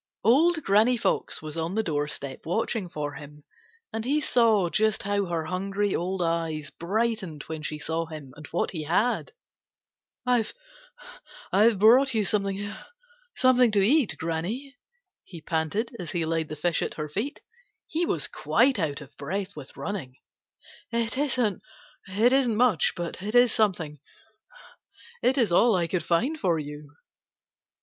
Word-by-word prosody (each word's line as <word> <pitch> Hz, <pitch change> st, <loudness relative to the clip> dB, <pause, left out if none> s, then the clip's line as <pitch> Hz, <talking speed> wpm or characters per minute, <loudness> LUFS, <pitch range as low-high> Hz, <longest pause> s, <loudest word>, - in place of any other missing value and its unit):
Old 315 Hz, -, +4 dB
Granny 220 Hz, +5 st, +4 dB
Fox 215 Hz, -, 0 dB
was 155 Hz, 0 st, -6 dB
on 165 Hz, +4 st, -2 dB
the 220 Hz, -, +1 dB
doorstep 145 Hz, -4 st, -3 dB
watching 190 Hz, +2 st, -1 dB
for 145 Hz, -2 st, -4 dB
him, 150 Hz, -1 st, -11 dB, 0.5 s
and 225 Hz, 0 st, -3 dB
he 280 Hz, +5 st, +1 dB
saw 225 Hz, -9 st, +3 dB
just 215 Hz, +4 st, +1 dB
how 200 Hz, 0 st, 0 dB
her 170 Hz, -3 st, -2 dB
hungry 195 Hz, +3 st, -1 dB
old 180 Hz, +1 st, -1 dB
eyes 165 Hz, -3 st, -2 dB
brightened 195 Hz, -4 st, -2 dB
when 160 Hz, -1 st, -6 dB
she 155 Hz, 0 st, -4 dB
saw 165 Hz, +2 st, -2 dB
him 150 Hz, -5 st, -9 dB
and 150 Hz, 0 st, -11 dB
what 170 Hz, -, -1 dB
he 160 Hz, -4 st, -5 dB
had. 215 Hz, -, +1 dB, 0.9 s
"I've 245 Hz, -3 st, +1 dB, 1.2 s
brought 245 Hz, +5 st, +5 dB
you 215 Hz, -2 st, +2 dB
something 195 Hz, -1 st, 0 dB
to 255 Hz, -, 0 dB
eat, 250 Hz, +5 st, +3 dB
Granny," 190 Hz, -, -3 dB, 0.5 s
he 170 Hz, -, -11 dB
panted, 165 Hz, -, -2 dB
as 175 Hz, -, -5 dB
he 170 Hz, -2 st, 0 dB
laid 160 Hz, -1 st, -1 dB
the 155 Hz, -, -5 dB
fish 170 Hz, +2 st, 0 dB
at -, -, -3 dB
her 150 Hz, -1 st, -4 dB
feet. 220 Hz, -, -4 dB, 0.4 s
He 330 Hz, +2 st, -1 dB
was 150 Hz, -, 0 dB
quite 230 Hz, -, +2 dB
out 150 Hz, -4 st, -2 dB
of 140 Hz, -1 st, -13 dB
breath 190 Hz, +7 st, -4 dB
with 145 Hz, -3 st, -11 dB
running. 165 Hz, -11 st, -5 dB, 0.8 s
"It 230 Hz, 0 st, 0 dB
isn't 255 Hz, -8 st, +1 dB, 0.9 s
much, 230 Hz, -, +3 dB
but 175 Hz, +1 st, -5 dB
it 210 Hz, +4 st, -3 dB
is 245 Hz, -1 st, +6 dB
something. 175 Hz, -9 st, 0 dB, 1.2 s
It 260 Hz, +2 st, +2 dB
is 230 Hz, -8 st, +3 dB
all 225 Hz, +5 st, +5 dB
I 175 Hz, -2 st, +1 dB
could 175 Hz, +1 st, -1 dB
find 255 Hz, -, 0 dB
for 175 Hz, -, +1 dB
you." 150 Hz, -1 st, -7 dB
190 Hz, 145 wpm, -26 LUFS, 160-230 Hz, 1.2 s, is